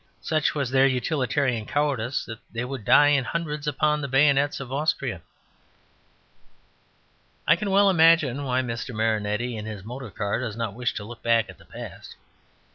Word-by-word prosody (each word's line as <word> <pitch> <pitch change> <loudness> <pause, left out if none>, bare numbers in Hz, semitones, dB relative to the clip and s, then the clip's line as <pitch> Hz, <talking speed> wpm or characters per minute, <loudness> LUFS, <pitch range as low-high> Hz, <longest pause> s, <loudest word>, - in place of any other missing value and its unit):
Such 155 -1 0
was 140 -4 -1
their 135 0 +5
utilitarian 130 -3 0
cowardice 140 -4 -1
that 115 -1 -8
they 115 +2 -3
would 130 -4 -6
die 145 0 +6
in 145 -3 +3
hundreds 150 +1 -4
upon 150 +1 +1
the 140 - -3
bayonets 140 +1 +3
of 135 -1 -7
Austria. 155 +3 -1 2.3
I 165 - +6
can 200 +4 -3
well 200 +1 +5
imagine 160 -7 +4
why 130 -1 0
Mr. 120 0 -5
Marinetti 110 +2 -1
in 110 0 -6
his 105 -3 -7
motor 125 +1 -7
car 100 +2 -2
does 115 -4 -4
not 115 -3 -3
wish 120 0 -2
to 105 - -4
look 115 +3 -10
back 115 -1 +2
at - - -18
the - - -18
past. - - -10
130 Hz, 170 wpm, -25 LUFS, 115-150 Hz, 2.3 s, die